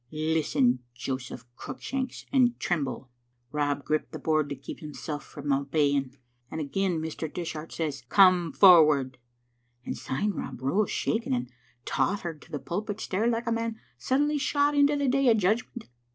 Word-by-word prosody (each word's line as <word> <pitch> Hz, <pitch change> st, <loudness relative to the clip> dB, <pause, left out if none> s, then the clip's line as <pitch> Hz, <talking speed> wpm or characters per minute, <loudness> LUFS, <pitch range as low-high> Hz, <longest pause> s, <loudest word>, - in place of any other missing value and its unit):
Lis 155 Hz, 0 st, -1 dB
ten, 125 Hz, -3 st, +3 dB, 0.2 s
Joseph 125 Hz, -1 st, -5 dB
Cruickshanks, 265 Hz, -, -5 dB
and 245 Hz, -3 st, +3 dB
tremble. 140 Hz, -6 st, -2 dB, 0.4 s
Rob 145 Hz, -1 st, -1 dB
gripped 155 Hz, 0 st, -1 dB
the -, -, -5 dB
board 155 Hz, -2 st, +1 dB
to 140 Hz, -, -3 dB
keep 135 Hz, -, -9 dB
himsel' 150 Hz, 0 st, -6 dB
frae -, -, -11 dB
obeying, 140 Hz, -1 st, +1 dB, 0.3 s
and 160 Hz, -, -5 dB
again 175 Hz, +3 st, -1 dB
Mr. 160 Hz, -1 st, -4 dB
Dishart 165 Hz, -2 st, -5 dB
says, 150 Hz, -5 st, -3 dB
*Come 185 Hz, -4 st, +5 dB
forward,' 150 Hz, -9 st, +6 dB, 0.7 s
and -, -, -3 dB
syne 205 Hz, +11 st, -2 dB
Rob 190 Hz, -, -6 dB
rose 185 Hz, +11 st, +1 dB
shak 225 Hz, +1 st, -1 dB
ing, 130 Hz, -, +1 dB
and 125 Hz, +1 st, -4 dB, 0.3 s
tottered 170 Hz, -6 st, -1 dB
to -, -, -17 dB
the 150 Hz, -, -2 dB
pulpit 205 Hz, +7 st, -4 dB
stair 210 Hz, +3 st, -1 dB
like 235 Hz, 0 st, 0 dB
a 230 Hz, -, -1 dB
man 230 Hz, -1 st, -2 dB, 0.2 s
suddenly 295 Hz, +3 st, +1 dB
shot 285 Hz, +1 st, +2 dB
into 285 Hz, 0 st, +4 dB
the 285 Hz, -1 st, 0 dB
Day 270 Hz, 0 st, +3 dB
of 225 Hz, -, +5 dB
Judgment. 220 Hz, +4 st, -1 dB
160 Hz, 165 wpm, -28 LUFS, 145-225 Hz, 0.7 s, forward